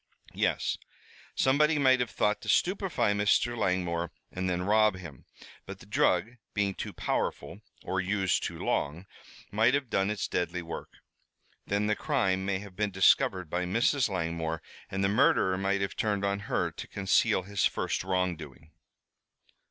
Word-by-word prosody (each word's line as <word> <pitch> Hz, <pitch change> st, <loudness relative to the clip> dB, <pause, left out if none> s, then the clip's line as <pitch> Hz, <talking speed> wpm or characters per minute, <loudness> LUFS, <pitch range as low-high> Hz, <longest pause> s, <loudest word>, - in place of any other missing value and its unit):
"Yes. -, -, 0 dB, 0.6 s
Somebody 150 Hz, +4 st, +3 dB
might 130 Hz, -3 st, +4 dB
have 125 Hz, -2 st, 0 dB
thought 105 Hz, 0 st, 0 dB
to -, -, -7 dB
stupefy 180 Hz, -, +1 dB
Mr. 105 Hz, +4 st, +2 dB
Langmore 90 Hz, -5 st, -1 dB, 0.2 s
and 95 Hz, 0 st, -2 dB
then 90 Hz, 0 st, -1 dB
rob 105 Hz, +1 st, +4 dB
him. 85 Hz, -8 st, -10 dB, 0.4 s
But -, -, -7 dB
the -, -, -15 dB
drug, 120 Hz, +4 st, +1 dB, 0.2 s
being 100 Hz, -1 st, +1 dB
too -, -, -5 dB
powerful, -, -, -3 dB, 0.2 s
or 95 Hz, -, -1 dB
used 95 Hz, -1 st, 0 dB
too -, -, -4 dB
long, 80 Hz, +6 st, -2 dB, 0.5 s
might 110 Hz, +5 st, +3 dB
have 140 Hz, -4 st, -2 dB
done 95 Hz, +1 st, +1 dB
its 105 Hz, -1 st, -2 dB
deadly 90 Hz, 0 st, -2 dB
work. 85 Hz, -, -7 dB, 0.8 s
Then 100 Hz, +1 st, 0 dB
the 105 Hz, 0 st, +1 dB
crime 95 Hz, -11 st, 0 dB
may 100 Hz, -1 st, +1 dB
have 100 Hz, -1 st, -10 dB
been 105 Hz, +1 st, 0 dB
discovered 95 Hz, -1 st, +3 dB
by 90 Hz, +3 st, -2 dB
Mrs. 115 Hz, +7 st, +2 dB
Langmore 80 Hz, -3 st, -2 dB, 0.3 s
and 95 Hz, +1 st, -2 dB
the -, -, +4 dB
murderer 100 Hz, -4 st, +3 dB
might 100 Hz, +1 st, 0 dB
have 100 Hz, 0 st, -2 dB
turned 100 Hz, -2 st, 0 dB
on 100 Hz, 0 st, 0 dB
her -, -, 0 dB
to -, -, -8 dB
conceal 95 Hz, -1 st, +2 dB
his 100 Hz, 0 st, +1 dB
first -, -, -2 dB
wrongdoing." 85 Hz, -6 st, -3 dB
100 Hz, 160 wpm, -29 LUFS, 90-110 Hz, 0.8 s, might